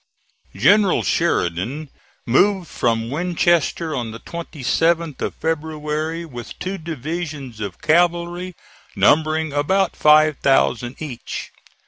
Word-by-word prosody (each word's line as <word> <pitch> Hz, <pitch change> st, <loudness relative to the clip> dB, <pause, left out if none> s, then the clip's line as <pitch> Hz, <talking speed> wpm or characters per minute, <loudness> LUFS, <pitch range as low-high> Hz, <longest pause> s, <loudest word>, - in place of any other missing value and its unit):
General 185 Hz, -, +4 dB
Sheridan 135 Hz, -, -1 dB, 0.3 s
moved 185 Hz, -, +3 dB
from 115 Hz, -2 st, -1 dB
Winchester 170 Hz, -1 st, +1 dB
on 120 Hz, -3 st, -3 dB
the 115 Hz, +1 st, -8 dB
27th 165 Hz, 0 st, -1 dB
of -, -, -3 dB
February, 160 Hz, +1 st, -3 dB
with 120 Hz, -7 st, -9 dB
two 190 Hz, +1 st, -4 dB
divisions 155 Hz, -5 st, -5 dB
of 100 Hz, -4 st, -6 dB
cavalry, 175 Hz, +2 st, +1 dB, 0.4 s
numbering 155 Hz, 0 st, +2 dB
about 180 Hz, +6 st, +1 dB
five 155 Hz, -1 st, +5 dB
thousand 125 Hz, -2 st, +1 dB
each. 135 Hz, -7 st, -6 dB
155 Hz, 100 wpm, -21 LUFS, 135-170 Hz, 0.4 s, five